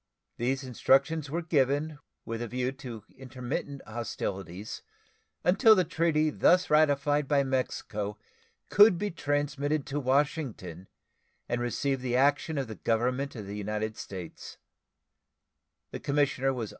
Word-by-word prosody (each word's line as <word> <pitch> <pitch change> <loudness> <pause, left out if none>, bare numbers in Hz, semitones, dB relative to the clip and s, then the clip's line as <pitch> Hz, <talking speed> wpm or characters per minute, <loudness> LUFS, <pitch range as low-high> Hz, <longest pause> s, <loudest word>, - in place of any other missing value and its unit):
These 130 +3 -1
instructions 135 +4 +2
were 170 +4 -2
given 145 0 +1 0.3
with 115 0 -4
a 120 - -3
view 125 +2 -1
to 125 -5 -9
intermit 130 0 -4 0.2
hostilities 100 -4 -5 0.6
until 220 +5 +6
the 185 - +3
treaty 155 -2 +1
thus 180 +4 +3
ratified 145 -1 +3
by 140 0 +3
Mexico 110 -6 -2 0.5
could 205 -2 +7
be 205 +3 -2
transmitted 145 -1 -1
to 145 0 -3
Washington 130 - -1 0.6
and 120 - -1
receive 130 +2 -1
the 125 -1 -1
action 145 +4 +2
of 135 -3 -1
the 110 - -6
Government 125 +6 -1
of 105 -3 -6
the 100 +1 -6
United 105 +1 -3
States. 90 -6 -8
135 Hz, 120 wpm, -29 LUFS, 115-150 Hz, 0.6 s, could